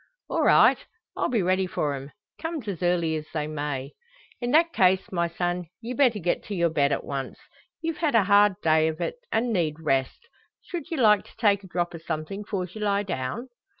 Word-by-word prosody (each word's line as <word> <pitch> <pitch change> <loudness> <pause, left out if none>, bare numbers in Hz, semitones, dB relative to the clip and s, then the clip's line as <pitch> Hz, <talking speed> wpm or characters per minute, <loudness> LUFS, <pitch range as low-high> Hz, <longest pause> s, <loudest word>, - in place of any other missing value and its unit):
"All - - +1
right! - - +6 0.4
I'll - - 0
be 230 -6 +1
ready 185 +1 +1
for 150 -5 -1
'em, 140 +1 -7 0.3
come's 325 -8 -4
as 190 -5 -4
early 175 -2 +1
as 155 0 -7
they 150 -1 0
may." 145 -3 -4 0.5
"In 240 - -2
that 330 +5 +4
case, 185 0 +3
my 170 -2 +1
son; 175 +1 -2
ye 235 +2 -5
better 250 -4 +3
get 175 -3 -1
to 205 - -4
your 170 -2 +2
bed 140 -2 +2
at - - -1
once. 135 -2 -5 0.5
Ye've 325 -1 -2
had 305 -6 +1
a 225 - +6
hard 205 0 +5
day 160 0 +4
o' 160 - -3
it, 175 - -3
and 230 +1 +1
need 165 -6 0
rest. 135 -4 -1 0.4
Should 335 -4 -6
ye 330 - -3
like 210 -5 +3
take 205 -3 +3
a - - -11
drop 175 -1 -2
o' 165 - -7
somethin' 160 +5 -4
'fores 185 -4 -4
you 215 - -8
lie 200 -1 +1
down?" 190 - -4
185 Hz, 210 wpm, -26 LUFS, 160-215 Hz, 0.5 s, right